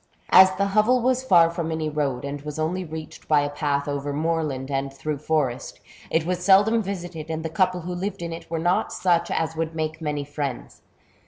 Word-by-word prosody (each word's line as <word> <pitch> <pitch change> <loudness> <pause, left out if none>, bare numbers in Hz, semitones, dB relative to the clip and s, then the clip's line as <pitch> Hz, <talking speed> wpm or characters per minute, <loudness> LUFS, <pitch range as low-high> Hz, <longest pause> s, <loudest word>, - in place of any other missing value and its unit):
As 190 0 +8
the 200 +1 0
hovel 215 +5 +3
was 255 +1 +1
far 170 -8 +5
from 170 -1 -3
any 160 -1 -2
road, 140 -4 -2
and 140 0 -5
was 150 0 -7
only 170 +4 -1
reached 160 -2 -9
by 150 -2 +4
a 145 0 -2
path 145 -1 -1
over 145 0 -2
moorland 150 -3 -2
and 135 0 -1
through 140 +2 -4
forest, 150 -5 -1 0.3
it 160 0 +1
was 180 0 -2
seldom 205 +4 +5
visited, 175 -5 -6
and 160 0 -3
the - - -1
couple 180 +1 +1
who 180 +2 -5
lived 185 0 -4
in 170 -1 -4
it 165 - -9
were 165 - -2
not 175 +3 +1
such 175 -2 +1
as 160 0 -1
would 160 0 -3
make 160 0 -3
many 150 -2 -2
friends. 145 -3 -5
160 Hz, 210 wpm, -24 LUFS, 145-180 Hz, 0.3 s, As